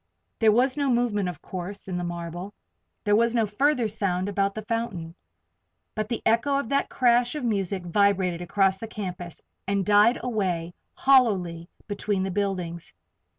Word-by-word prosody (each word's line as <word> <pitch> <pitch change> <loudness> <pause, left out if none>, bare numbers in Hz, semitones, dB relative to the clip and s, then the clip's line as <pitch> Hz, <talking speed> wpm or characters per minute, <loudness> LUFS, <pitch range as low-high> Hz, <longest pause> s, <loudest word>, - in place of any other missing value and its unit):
There 220 -1 +5
was 255 +5 +2
no 285 -2 +1
movement, 235 -6 +1
of 170 -5 -9
course, 190 +2 -6
in 185 - -3
the 175 - -3
marble. 175 +3 -6 0.5
There 205 0 +3
was 235 +2 +2
no 225 -2 +3
further 245 +3 +1
sound 195 -3 -1
about 200 0 0
the 215 - -5
fountain. 210 -8 -3 0.8
But 215 0 -3
the 235 - -3
echo 235 +5 +2
of 275 -5 -3
that 280 0 +1
crash 245 +1 +2
of 300 - -4
music 195 -5 -1
vibrated 185 -1 +2
across 190 +2 +2
the 225 - -6
campus 180 -5 -6 0.3
and 200 -1 0
died 210 +3 +5
away 185 -8 -1 0.2
hollowly 190 -11 +3 0.2
between 205 -1 -1
the 190 - -2
buildings. 180 - -3
205 Hz, 160 wpm, -26 LUFS, 180-230 Hz, 0.8 s, There